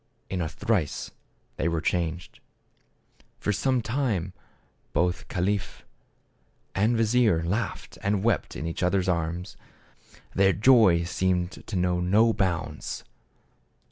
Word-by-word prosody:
In 95 -2 -1
a 80 - -1
trice, 90 -3 -1 0.5
they 80 - 0
were 85 -1 0
changed. 85 +1 -2 1.0
For 105 - -1
some 125 +4 +1
time 110 -9 -1 0.6
both 90 0 0
caliph 95 +2 -2 0.9
and 110 +4 +2
vizier 110 -6 +3
laughed 105 +8 -3
and 100 0 0
wept 115 -7 0
in 75 - -4
each 85 - -4
other's 90 +1 +1
arms. 85 +1 -2 0.8
Their 95 0 +4
joy 105 -7 +5
seemed 90 +1 0 0.2
to 110 - -4
know 90 -1 +1
no 105 +6 +4
bounds. 85 -7 -2
95 Hz, 115 wpm, -26 LUFS, 85-105 Hz, 1.0 s, joy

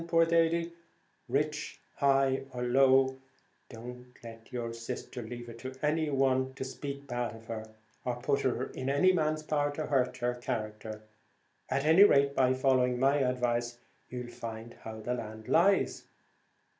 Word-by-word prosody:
Poor 165 0 +4
or 165 0 +3 0.7
rich, 150 +4 -1 0.2
high 135 -1 +3
or 125 0 -3
low, 130 +1 +4 0.5
don't 125 +1 -9 0.2
let 115 +1 -11
your 120 -2 -3
sister 120 +2 -6
leave 120 +1 -7
it 115 0 -10
to 130 +1 -7
any 155 +1 +1
one 130 -1 +1
to 130 - -4
speak 140 +1 -6
bad 120 -3 -3
of 115 0 -13
her, 110 -1 -5 0.4
or 125 -1 -1
put 135 +3 0
it 130 0 -1
in 130 +1 -3
any 185 +7 +4
man's 155 -2 0
power 145 -1 +1
to 150 +1 -4
hurt 130 -3 +1
her 125 -1 0
character. 110 -3 -5 0.7
At 140 +2 0
any 165 +6 +8
rate, 140 -8 +5
by 130 -1 +3
following 130 -2 +2
my 135 +2 +4
advice, 120 -2 0 0.3
you'll 125 -1 -6
find 115 0 -7
how 110 0 -9
the 120 +3 -2
land 110 -2 -6
lies." 195 +4 +3
130 Hz, 155 wpm, -31 LUFS, 120-140 Hz, 0.7 s, any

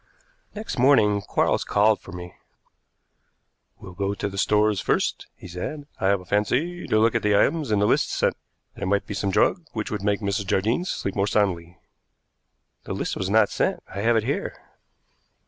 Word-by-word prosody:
Next 215 - -5
morning 105 -6 +4
Quarles - - 0
called 105 +1 +3
for - - -12
me. 90 0 -8 1.4
"We'll 90 - -11
go 100 +2 -2
to 100 - -3
the 100 - -9
stores 105 0 +2
first," - - -1
he - - -12
said. 90 - -6
"I 95 - +1
have 100 0 +3
a 90 - -13
fancy 135 - -1
to 110 - +2
look 115 +1 +3
at 115 - +1
the 105 -1 +3
items 155 +4 +1
in 105 - +2
the 100 - +2
list - - +2
sent. - - +1 0.4
There - - -5
might 100 +1 +1
be - - -6
some 100 0 -1
drug 175 - +2
which 110 -2 -4
would 105 -2 -3
make 100 0 +1
Mrs. 100 0 -2
Jardine 110 - +1
sleep 100 - -3
more 100 0 +1
soundly." 90 -5 0 1.1
"The - - -4
list - - -3
was 95 - -3
not 105 0 +4
sent. - - -1
I 100 - -4
have 115 +2 +3
it 110 - +1
here." 135 +5 -3
105 Hz, 190 wpm, -24 LUFS, 100-110 Hz, 1.4 s, morning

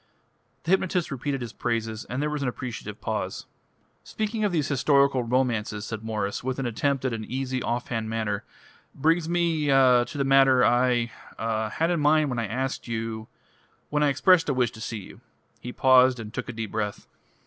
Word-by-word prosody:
The 165 - -2
hypnotist 185 -3 +1
repeated 135 0 -3
his 120 - -6
praises, 115 -2 -3
and 130 +4 -3
there 150 - 0
was 150 -1 -3
an 135 - -1
appreciative 125 -1 -6
pause. - - -3 0.6
"Speaking 215 0 -3
of 205 - +1
these 155 -4 0
historical 140 -1 +3
romances," 115 -4 -1
said 110 0 -5
Mwres, 105 -2 -3
with 130 0 -2
an 135 - -2
attempt 135 +3 -1
at 130 - 0
an 110 -1 -4
easy, 130 +1 -3
off 120 +1 -2
hand 115 -2 -2
manner, 110 -3 -2 0.5
"brings 160 +3 +1
me 170 -4 +1
ah 130 -3 +5
to 145 - -8
the 140 - +1
matter 135 -1 +5
I 120 -1 +2 0.3
ah 110 -1 -1
had 165 +9 0
in 170 - +1
mind 150 -1 +3
when 120 - -2
I 115 - -2
asked 130 +5 -3
you 110 -1 -4 0.6
when 150 0 +1
I 150 - +4
expressed 165 +4 +4
a 140 - +1
wish 125 -3 +1
to 110 - -12
see 110 -1 -4
you." - - -13 0.4
He 125 - -7
paused 130 -1 +5
and 110 -1 -8
took 125 -1 -5
a - - -2
deep 110 -1 -5
breath. 105 -1 -3
130 Hz, 195 wpm, -26 LUFS, 115-145 Hz, 0.6 s, ah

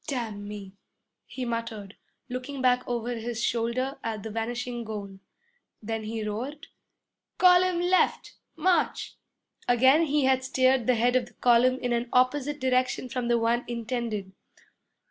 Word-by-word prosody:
'Damn 225 -7 -4
me!' 200 -2 -8 0.5
he 255 - -5
muttered, 230 -4 -4 0.3
looking 255 +2 -5
back 250 -1 +3
over 240 0 -2
his 230 0 -4
shoulder 240 +4 -1
at 220 -3 -4
the 220 - -6
vanishing 240 +2 -3
goal. 200 -3 -7 0.6
Then 220 0 -4
he 220 0 -3
roared, 255 +9 -5 0.7
'Column 360 -1 +5
left! 360 +1 +1 0.2
March!' 370 -1 0 0.5
Again 265 +7 +5
he 295 0 +2
had 260 0 +3
steered 260 -2 +2
the 250 - +4
head 245 +2 +2
of 250 -2 +2
the 240 - -18
column 250 +2 +4
in 245 -1 0
an 235 0 -1
opposite 280 +3 +2
direction 255 0 0
from 245 -1 -2
the 240 0 +3
one 235 +1 +1
intended. 235 -4 -3
245 Hz, 145 wpm, -27 LUFS, 225-260 Hz, 0.7 s, Column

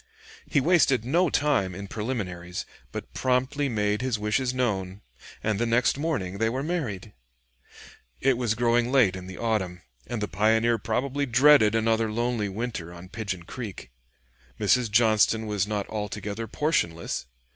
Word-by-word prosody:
He 145 - +2
wasted 140 -6 +3
no 170 +7 +2
time 130 -12 +1
in 100 +1 -7
preliminaries, 95 -6 -4 0.3
but - - -7
promptly 130 +3 0
made 105 -1 0
his 130 -3 0
wishes 105 +5 0
known, 100 -6 -2 0.4
and 105 -2 0
the 120 - +1
next 115 +2 +3
morning 135 - -2
they 110 0 +2
were 130 +4 -2
married. 150 - -3 1.1
It 135 -1 +3
was 120 -3 0
growing 120 +1 +2
late 120 -9 +4
in 90 0 -8
the 95 - -8
autumn, 95 -6 -2 0.2
and 120 - -3
the 105 - -2
pioneer 110 +4 +2
probably 135 +7 -1
dreaded 125 -3 +6
another 115 0 +1
lonely 120 -2 -1
winter 100 -5 -4
on 85 +1 -11
Pigeon 100 -5 -4
Creek. 100 - -8 0.7
Mrs. 115 +3 +3
Johnston 110 0 +3
was 105 -2 -1
not 105 -2 -2
altogether 105 +1 -4
portionless. 85 - -1
110 Hz, 145 wpm, -26 LUFS, 100-125 Hz, 1.1 s, dreaded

